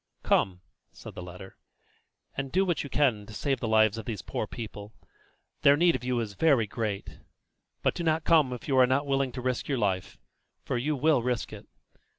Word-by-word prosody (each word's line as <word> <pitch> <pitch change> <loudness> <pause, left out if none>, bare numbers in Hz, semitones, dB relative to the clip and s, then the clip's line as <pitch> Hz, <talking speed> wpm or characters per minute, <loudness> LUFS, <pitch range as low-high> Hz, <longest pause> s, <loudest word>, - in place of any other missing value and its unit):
"Come," 90 -2 +1 0.3
said - - -11
the - - -8
letter, 90 +2 -10 0.8
"and 135 -1 -4
do 190 +2 +3
what 175 -3 0
you 140 - -7
can 120 -9 +1
to 110 - -10
save 135 +1 -1
the 120 - -2
lives 110 0 +3
of 110 - -8
these 110 -5 -5
poor - - -3
people 105 -2 -8 0.7
their 140 +1 +6
need 170 +1 +4
of - - -5
you 125 -1 0
is 105 -3 -5
very 135 -2 +3
great; 105 -2 -4 0.6
but - - +2
do 170 - -4
not 160 -1 +1
come 155 -6 +4
if 125 -2 -7
you 135 - +1
are 125 - +7
not 135 +3 +1
willing 135 -1 0
to 125 - -5
risk 125 0 -2
your 140 - 0
life, 100 -3 -1 0.5
for - - -2
you 145 +5 0
will 145 -1 +3
risk 125 -1 -2
it. - - -10
125 Hz, 205 wpm, -28 LUFS, 110-140 Hz, 0.8 s, are